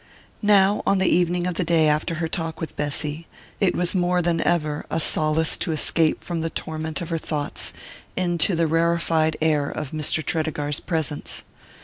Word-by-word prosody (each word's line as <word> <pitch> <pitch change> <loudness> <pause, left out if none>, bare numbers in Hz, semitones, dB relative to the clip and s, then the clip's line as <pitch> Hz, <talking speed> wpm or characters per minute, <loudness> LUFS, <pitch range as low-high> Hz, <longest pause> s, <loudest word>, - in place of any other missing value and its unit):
Now, 205 -1 +4
on 200 - +4
the 190 - +1
evening 175 0 +2
of 180 - -1
the 175 - -1
day 165 -2 +3
after 150 +2 +1
her 165 0 -2
talk 165 -1 -4
with 160 - -6
Bessy, 150 +2 -3 0.3
it 195 -3 +2
was 175 -1 +1
more 180 -1 +1
than 170 -1 +1
ever 155 -4 0
a 160 - -1
solace 155 0 +3
to - - -2
escape 155 +1 +1
from 170 -2 -3
the 165 - -2
torment 160 +1 -4
of 170 - -5
her 165 -1 -1
thoughts 150 -2 -1 0.5
into 175 0 +1
the 165 0 +2
rarefied 165 -1 +1
air 150 -3 +2
of 150 -3 -5
Mr. 155 0 0
Tredegar's 150 -2 -1
presence. 160 -4 -3
165 Hz, 175 wpm, -23 LUFS, 155-175 Hz, 0.5 s, Now